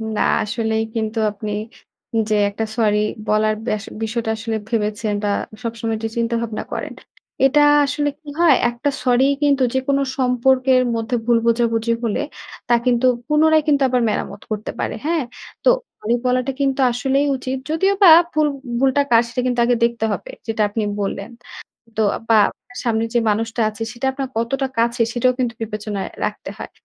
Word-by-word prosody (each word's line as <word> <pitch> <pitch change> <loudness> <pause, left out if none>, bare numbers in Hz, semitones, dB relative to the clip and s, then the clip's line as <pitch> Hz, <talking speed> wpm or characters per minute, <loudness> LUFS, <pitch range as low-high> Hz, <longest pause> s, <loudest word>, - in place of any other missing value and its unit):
না - - 0 0.2
আসলেই 220 +1 -1
কিন্তু 220 0 -2
আপনি 210 +1 -6 0.8
যে 215 - +2
একটা 220 +2 -3
সরি 210 -2 +3 0.3
বলার 215 0 +2
ব্যাস 215 -4 -2 0.2
বিষয়টা 225 0 -2
আসলে 225 0 -3
ভেবেছেন 210 -1 -1
বা 205 - +1 0.3
সবসময় 230 -1 -3
যে - - 0
চিন্তাভাবনা 230 -1 -1
করেন। - - -4 0.5
এটা 295 +2 +4 0.2
আসলে 290 +1 -1
কি 315 - -25
হয়? 325 -6 +6
একটা 240 +4 -2
সরিই 260 +2 +3
কিন্তু 280 -2 +3
যেকোনো 275 +1 +1 0.2
সম্পর্কের 255 0 +3
মধ্যে 225 +2 -2
ভুল 235 -1 +4
বোঝাবুঝি 230 0 +1
হলে, 225 -3 0 0.5
তা 240 - +5
কিন্তু 245 0 +2 0.2
পুনরায় 310 +1 +4
কিন্তু 285 -2 +3
আবার 250 -1 +2
মেরামত 210 - -3
করতে 215 0 -3
পারে। - - -2
হ্যাঁ? 325 -2 +1 0.4
তো - - +5 0.3
সরি 230 +3 0
বলাটা 255 +1 +1
কিন্তু 270 0 +1
আসলেই 270 +4 +1
উচিত। 260 +1 -4
যদিওবা 385 +4 +4 0.2
ভুল 305 -1 +3 0.3
ভুলটা 270 +2 +3
কার, 230 - +7
সেটা 245 +2 -3
কিন্তু 245 -1 0
আগে 245 0 +3
দেখতে 235 -1 +1
হবে। - - -5 0.2
যেটা 220 -1 -1
আপনি 215 +1 -2 0.2
বললেন। 200 +1 -3 0.7
তো 220 - +2 0.3
বা 225 - +5
আপনার 245 - -13
সামনে 225 -2 +1
যে - - +4
মানুষটা 225 +3 -1
আছে, 215 +1 -8
সেটা 245 +2 -4
আপনার 270 -1 -4
কতটা 270 +4 0
কাছের, 235 0 +2
সেটাও 250 +1 +2
কিন্তু 245 -2 -1
বিবেচনায় 210 -2 -4 0.2
রাখতে - - -4
হয়। - - -7
235 Hz, 165 wpm, -20 LUFS, 220-265 Hz, 0.8 s, কার